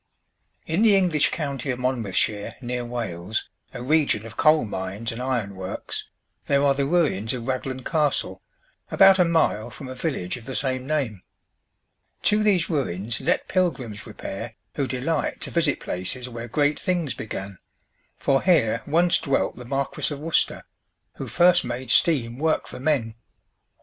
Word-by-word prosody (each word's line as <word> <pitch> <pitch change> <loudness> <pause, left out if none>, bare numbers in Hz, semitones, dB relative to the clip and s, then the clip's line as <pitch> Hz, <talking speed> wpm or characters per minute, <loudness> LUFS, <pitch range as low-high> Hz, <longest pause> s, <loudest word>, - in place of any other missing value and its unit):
In 165 +6 0
the 220 -3 +6
English 180 -6 +3
county 140 -4 -3
of 125 - 0
Monmouthshire, 110 -5 0
near 125 -1 -3
Wales, 110 -5 -3 0.2
a 120 - -7
region 140 -6 +2
of 115 0 -10
coal 155 -2 +4
mines 100 +3 -4
and 115 +2 -6
iron 125 -6 -1
works, 95 -1 -5 0.4
there 140 0 +3
are 140 - +5
the 135 0 0
ruins 140 - +1
of 120 -2 -6
Raglan 130 0 -3
Castle, 150 -2 0 0.5
about 195 0 +6
a - - +7
mile 160 -10 +1
from 135 - -9
a 130 - -6
village 130 - -2
of 120 - -12
the 130 - -5
same 130 -2 -1
name. 135 -11 -1 1.0
To 210 +1 +4
these 200 -5 +3
ruins 115 - -2
let - - 0
pilgrims 130 - -1
repair 110 +1 -7 0.2
who 140 -2 -1
delight 140 +5 -1
to - - -4
visit 165 -4 +2
places 120 +8 -4
where 120 -1 -7
great 145 +4 +1
things 175 -8 -1
began; 100 -5 -6 0.6
for 135 -1 +2
here 115 - +3
once 170 +4 +3
dwelt 135 -2 0
the 125 - -10
Marquis 135 +4 -2
of 145 - -4
Worcester, 160 +2 +1 0.5
who - - -5
first 175 0 +4
made 120 0 -4
steam 125 -7 +3
work 160 +1 +1
for - - -8
men. 130 -6 0
130 Hz, 160 wpm, -24 LUFS, 115-155 Hz, 1.0 s, a